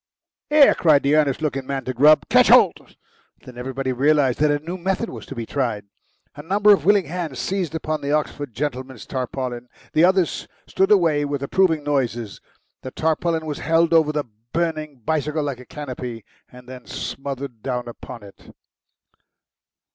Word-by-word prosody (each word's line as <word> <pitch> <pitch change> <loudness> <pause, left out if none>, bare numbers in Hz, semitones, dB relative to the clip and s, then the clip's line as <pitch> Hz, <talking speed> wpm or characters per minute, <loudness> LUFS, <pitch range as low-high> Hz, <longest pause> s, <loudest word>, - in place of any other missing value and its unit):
"Here!" 300 -2 +6
cried 155 -5 +3
the 140 +2 +3
earnest 150 -1 +1
looking 135 -3 -2
man 135 -1 -3
to 130 - -3
Grubb. 150 +5 +5
"Ketch - - +5
holt!" - - +4 0.5
Then 125 - -11
everybody 130 +1 -3
realised 140 -1 +2
that 150 0 +3
a 145 - +2
new 165 +5 -6
method 190 +5 -2
was - - -9
to 135 - -8
be 115 -2 -4
tried. 115 -6 -2 0.5
A 145 - -8
number 205 +6 +4
of 200 - 0
willing 200 -2 +4
hands 160 -4 -5
seized 180 +3 -2
upon 155 -1 -3
the 140 - -3
Oxford 145 -2 -2
gentleman's 130 -2 -4
tarpaulin. 125 -1 -4 0.2
The 155 - +4
others 185 -2 +2 0.2
stood 190 - +1
away 165 -8 +3
with 145 -1 -3
approving 160 0 +2
noises. 120 -7 -2 0.4
The 130 - -6
tarpaulin 160 +2 -1
was 150 -2 -4
held 165 +2 +2
over 160 -2 +4
the 150 -1 -2 0.3
burning 155 -5 -2
bicycle 150 +1 -1
like 140 -4 -4
a 125 - -12
canopy, 125 -7 -7 0.3
and 125 0 -15
then 125 -1 -11
smothered 135 -4 -6
down 125 0 -3
upon 120 -1 -10
it. 100 -1 -16
145 Hz, 170 wpm, -22 LUFS, 130-160 Hz, 0.5 s, Here